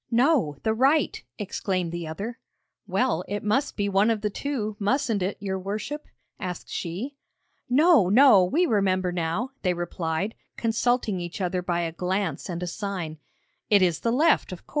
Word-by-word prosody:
'No; 240 - +3
the 220 - +2
right,' 275 +6 +2 0.2
exclaimed 185 -4 -2
the 170 -1 -4
other. 205 +10 -5 0.5
'Well, 245 -9 +1
it 205 0 -3
must 265 +8 0
be 205 -1 0
one 200 +2 +3
of 220 -2 0
the 210 -1 -1
two, 220 -5 -3
mustn't 225 0 +1
it, 190 +2 -1
your 190 -1 -3
worship?' 215 +10 -4 0.3
asked 180 -3 -5
she. 215 +12 -4 0.5
'No, 280 - +5
no! 235 -3 +7
we 310 - +2
remember 190 - +1
now,' 175 +9 -2
they 180 -2 +1
replied, 175 +3 -2 0.2
consulting 230 -3 +1
each 175 +2 -6
other 180 -1 -1
by 175 -1 -1
a 165 -1 -2
glance 180 -1 -2
and 175 0 -3
a - - -3
sign; 175 -5 -4 0.5
'it 205 -3 +6
is 175 -4 +2
the 230 - 0
left, 305 +1 +3
of 180 - -9
course.' - - -25
200 Hz, 170 wpm, -26 LUFS, 180-235 Hz, 0.5 s, no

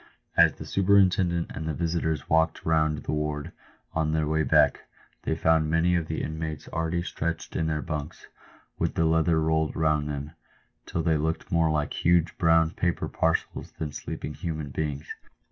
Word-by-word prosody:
As - - +6
the - - -9
superintendent 95 -3 +3
and 80 +1 -5
the 80 - -2
visitors 80 -2 -1
walked 80 +1 +1
round 80 -2 +1
the - - -3
ward 75 +1 -2 0.4
on 80 -1 0
their 80 -1 +1
way 80 +1 +1
back, - - +3 0.4
they 80 - 0
found 80 -1 +2
many 80 +2 +2
of 85 -2 -1
the 80 - -3
inmates 80 0 -5
already 80 +1 -1
stretched 85 -1 -4
in 80 - 0
their 75 -2 -1
bunks, 75 +2 -5 0.5
with - - 0
the 80 - +2
leather 80 0 +3
rolled 80 0 +1
round 75 -2 +1
them, 70 +1 -4 0.6
till 80 - -2
they 80 -1 +2
looked 80 +2 -2
more 85 -1 +3
like 75 -1 0
huge 85 -1 +3
brown 80 -1 +4
paper 90 0 -1
parcels 80 0 -1
than 75 -2 -5
sleeping 75 +1 -6
human 80 -3 -4
beings. 75 -1 -3
80 Hz, 170 wpm, -27 LUFS, 75-80 Hz, 0.6 s, As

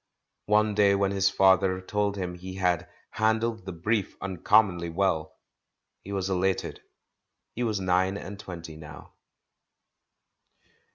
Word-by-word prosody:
One 105 0 +3
day 100 -1 +4
when 100 0 +1
his 95 -1 +2
father 95 -1 +3
told 100 +2 -1
him 90 -2 -3
he 95 +1 -8
had 90 -2 0 0.2
"han 110 0 +2
dled 115 -4 -3
the 95 - -5
brief 95 +4 -1
uncommonly 95 -1 +2
well," 80 -3 -1 0.7
he 100 - -9
was 95 -2 -2
elated. 95 -1 -1 0.7
He 120 - -5
was 110 -4 0
nine 95 +1 +1
and 100 0 -8
twenty 85 -5 -8
now. 75 -1 -12
95 Hz, 130 wpm, -27 LUFS, 90-100 Hz, 0.7 s, day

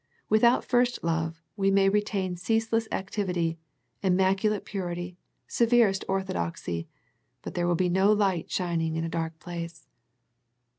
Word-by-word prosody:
Without 235 +3 +4
first 245 0 +1
love 165 0 -1
we 195 -2 +2
may 195 0 +4
retain 195 -2 0
ceaseless 225 +4 0
activity, 180 -4 -2 0.4
im 185 -2 +2
maculate 195 +2 +1
purity, 175 -2 -4 0.3
severest 230 -5 +3
orthodoxy, 85 - -2 0.6
but - - -6
there 175 0 0
will 175 - +2
be 180 +2 +1
no 190 +3 +3
light 195 -5 +1
shining 165 -3 -1
in 165 - -1
a 165 - -2
dark 165 -1 -3
place. 170 -1 -7
185 Hz, 135 wpm, -27 LUFS, 170-205 Hz, 0.6 s, Without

